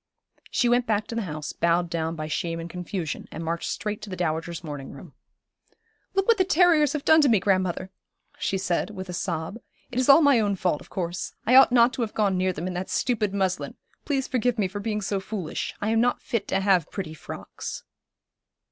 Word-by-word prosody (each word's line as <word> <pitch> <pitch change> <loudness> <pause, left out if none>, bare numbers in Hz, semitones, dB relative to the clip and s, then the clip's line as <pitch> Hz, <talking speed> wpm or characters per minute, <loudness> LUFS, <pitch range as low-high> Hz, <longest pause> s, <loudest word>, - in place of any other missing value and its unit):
She 245 - +1
went 245 0 +2
back 215 -1 +1
to - - -4
the 230 - -1
house, 150 -1 -5
bowed 170 +1 +2
down 165 -1 -2
by 155 -1 -4
shame 165 +2 -2
and 165 - -5
confusion, 180 -1 -5
and 165 - -6
marched 165 +1 -2
straight 210 -1 -3
to 210 - -8
the 185 - -4
dowager's 165 0 -2
morning 145 -4 -6
room. - - -12 1.0
'Look 390 0 +2
what 460 -3 +4
the - - +6
terriers 340 -5 +4
have 300 -2 -3
done 315 0 +7
to 285 - +4
me, 220 -4 +5
grandmother,' 185 -1 0 0.5
she 195 - 0
said, 185 0 -1
with 190 -3 -7
a - - -4
sob. 175 +3 -3 0.3
'It 245 - -1
is 255 - +1
all 295 +4 +8
my 280 -4 +5
own 205 -2 +1
fault, 180 -5 0
of - - -15
course. 175 -1 -4
I 235 - +3
ought 265 -1 +8
not 245 0 +5
to 245 - -3
have 225 -2 -3
gone 200 -3 +2
near 185 0 +1
them 170 -1 -5
in 185 - -3
that 180 +1 -4
stupid 220 -5 0
muslin. 190 -2 -1 0.3
Please 270 -3 -1
forgive 245 -1 0
me 205 -3 +1
for 205 +3 -6
being 210 0 -2
so 200 0 -1
foolish. 190 -4 -4
I 210 - 0
am 225 0 +3
not 245 +1 +2
fit 230 - -2
to 195 - 0
have 190 -5 +3
pretty 175 -6 -5
frocks.' 160 - -7
195 Hz, 220 wpm, -25 LUFS, 175-235 Hz, 1.0 s, all